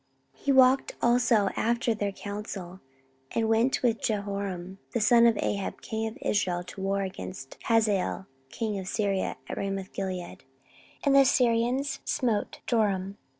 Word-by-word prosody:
14:022:005 - - -24
He 280 - +3
walked 265 0 +5
also 240 0 +3 0.2
after 235 0 +1
their 205 -2 -2
counsel, 195 -3 -7 0.5
and 225 -1 +1
went 225 +5 +2
with 235 -2 +2
Jehoram 200 -3 -3
the 235 - +1
son 235 +2 +6
of 225 -2 +3
Ahab 200 -1 -2
king 220 0 -2
of 220 +4 -7
Israel 180 -4 0
to 185 +2 -9
war 195 +1 0
against 135 - -7
Hazael 210 -4 +1 0.2
king 210 +4 -3
of 185 - -7
Syria 200 -2 -1
at - - -5
Ramothgilead: 190 -2 -4 0.6
and 280 -1 +4
the 275 - +8
Syrians 250 +2 +2
smote 235 -7 -1
Joram. 200 -4 0
210 Hz, 145 wpm, -28 LUFS, 195-235 Hz, 0.6 s, the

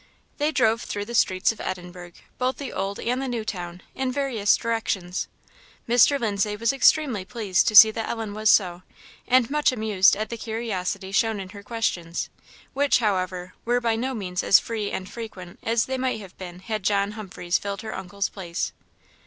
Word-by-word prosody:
They 295 +1 +2
drove 230 -5 +2
through 205 0 -4
the 235 - -8
streets 185 -4 +3
of 225 - -9
Edinburgh, 180 -1 -6 0.3
both 255 +1 0
the 280 -3 -6
Old 195 +1 -3
and 250 +3 -1
the 270 - -3
New 235 -3 -3
Town, 180 -3 -6
in 260 -1 -2
various 255 -7 +2
directions. 205 -6 -2 0.6
Mr. 245 +4 +5
Lindsay 210 -2 0
was 230 +4 +1
extremely 270 -6 +3
pleased 200 -3 0
to 215 - +1
see 220 +1 +11
that 225 0 -4
Ellen 225 -3 -3
was 215 0 +1
so, 180 -4 +3 0.5
and 255 -2 +4
much 300 -1 +3
amused 215 -6 +3
at 215 +2 -3
the 235 - -4
curiosity 200 -4 -3
shown 220 +1 +1
in 190 -1 -7
her 200 +1 -10
questions, 195 -7 -2 0.4
which, 285 +1 +3
however, 185 -4 -1
were 240 +1 +2
by 230 -2 +1
no 255 +3 -2
means 180 -4 -3
as 195 - +6
free 215 -3 -3
and 185 - -4
frequent 200 -5 -9
as 230 -1 +1
they 260 0 -3
might 255 -3 -1
have 190 -3 -12
been 180 -1 -8
had 215 +2 -3
John 200 +1 +1
Humphreys 190 -4 -2
filled 200 +2 -5
her 220 - -5
uncle's 190 +1 -3
place. 175 -3 -4
215 Hz, 185 wpm, -25 LUFS, 190-235 Hz, 0.6 s, see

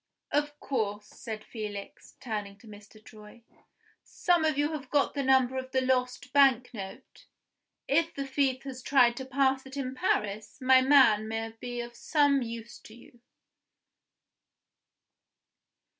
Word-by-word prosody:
Of 295 0 -1
course," 210 -6 -2
said 215 0 -8
Felix, 210 -3 -8
turning 210 -5 -5
to 220 - -18
Mr. 210 +1 -14
Troy, 215 +2 -15 0.6
"some 350 -2 +1
of 310 -3 +1
you 295 +2 +1
have 285 -4 -6
got 290 -1 +1
the 285 - -2
number 260 -1 +3
of 260 0 -5
the 260 - +2
lost 255 +1 -1
bank 260 -3 +4
note? 195 -3 -10 0.6
If 330 +3 +1
the 275 - -3
thief 270 -1 0
has 260 -2 -7
tried 245 -3 +4
to 265 - -5
pass 265 0 +1
it 265 +1 -10
in 260 -2 -3
Paris, 215 -4 -2
my 260 0 +5
man 255 -6 +5
may 225 0 -4
be 240 +2 -6
of 240 0 -8
some 285 -1 +2
use 235 0 -7
to 220 - -15
you." 240 0 -18
255 Hz, 145 wpm, -29 LUFS, 225-275 Hz, 0.6 s, my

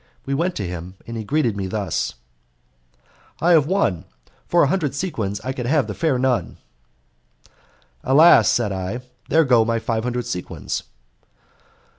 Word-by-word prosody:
We 140 - -2
went 175 +6 0
to 100 - -3
him, 90 +1 -7
and 115 - -7
he 110 - -4
greeted 130 -2 0
me 100 -2 -3
thus: 100 - -2 1.2
"I 175 - +3
have 155 -4 +5
won; 175 - 0 0.4
for 175 - +4
a - - +4
hundred 150 -4 -1
sequins 110 - -3
I 130 - -3
can 125 -2 -4
have 145 +1 +2
the - - -5
fair 155 -6 0
nun! 125 -1 0 1.5
"Alas!" 155 +6 +6
said 115 -4 +1
I, 95 +6 -4 0.3
"there 160 0 +4
go 120 -4 +5
my 115 +1 0
five 115 -1 -2
hundred 125 0 -2
sequins." 90 -7 -4
125 Hz, 155 wpm, -21 LUFS, 105-150 Hz, 1.5 s, Alas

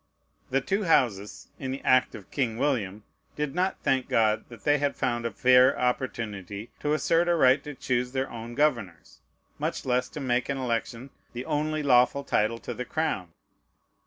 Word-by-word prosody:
The 135 +1 +1
two 195 +7 -1
Houses, 105 - +1
in 135 - -4
the 135 +1 -4
act 130 0 +3
of 100 - -12
King 120 -5 -1
William, 110 -7 -1 0.3
did 150 -2 -2
not 185 +3 0
thank 130 -1 +1
God 110 -1 +2
that 120 - -13
they 145 0 +3
had 145 0 0
found 120 -2 -1
a - - -5
fair 125 +4 +5
opportunity 110 -5 -3
to 150 - 0
assert 165 +2 +2
a 175 - +3
right 135 -3 +4
to 150 -2 -7
choose 125 -1 -1
their 135 0 -1
own 115 0 -7
governors, 115 - -1 0.4
much - - -3
less 125 0 0
to - - -7
make 125 -2 0
an 140 - -1
election 120 0 -3 0.2
the 125 +2 -5
only 155 0 -1
lawful 130 +1 +4
title 110 -3 0
to - - -5
the 125 - -4
crown. 115 - -2
125 Hz, 180 wpm, -27 LUFS, 115-145 Hz, 0.4 s, fair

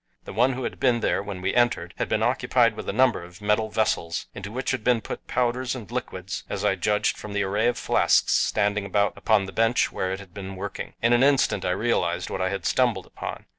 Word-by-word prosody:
The - - -9
one 125 +6 +3
who 130 +1 -4
had - - -4
been 120 -3 +2
there - - +1
when 100 -2 -6
we 95 - 0
entered 120 -8 +1
had - - -2
been - - +1
occupied - - +2
with - - -6
a - - +1
number 125 -3 +2
of 90 +2 -13
metal 105 +1 +1
vessels, 85 -6 -1
into 100 +1 -7
which 130 +3 -2
had 130 -4 -2
been 125 0 +3
put - - -8
powders 125 +1 0
and 115 -4 -9
liquids 95 -6 -4
as 100 +1 -3
I 105 - +4
judged 105 +3 0
from 105 - -7
the 105 0 +1
array 105 +4 +1
of 120 - +1
flasks - - +3
standing 105 -1 +1
about 100 +1 +1
upon 110 -3 +2
the 95 - -8
bench 115 +4 +2
where 95 - -2
it 95 - -3
had 95 -4 -13
been 95 0 -7
working. 100 +2 -6
In 115 +1 +4
an 120 - +4
instant 135 -8 +3
I - - +1
realized 90 -3 0
what 95 - -3
I 95 - +1
had 95 -2 -4
stumbled 120 -8 +1
upon. - - -7
105 Hz, 240 wpm, -25 LUFS, 95-120 Hz, -, I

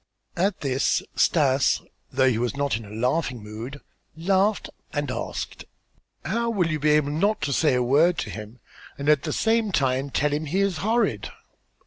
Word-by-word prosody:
At 190 +2 0
this 135 -2 +1
Stas, 135 -4 +3 0.3
though 130 - +3
he 120 -3 +2
was 125 +3 -2
not 140 -1 0
in 115 -1 -6
a - - -12
laughing 125 +2 -1
mood, 115 +7 -8 0.4
laughed 195 +5 +1 0.2
and - - -2
asked: - - -5 0.6
"How 235 +1 0
will 180 -7 +1
you 155 - -1
be 150 +1 +2
able 150 -1 +3
not 200 +8 +1
to 145 -1 -1
say 150 -1 +3
a 125 - +2
word 155 +8 +3
to - - -3
him 110 +3 -9 0.4
and 140 0 -5
at 150 -2 +5
the - - -3
same 225 -2 +1
time 135 -3 +1
tell 145 +2 0
him 150 +2 -1
he 180 +7 0
is 200 -4 +1
horrid?" 205 - 0
145 Hz, 180 wpm, -25 LUFS, 130-180 Hz, 0.6 s, at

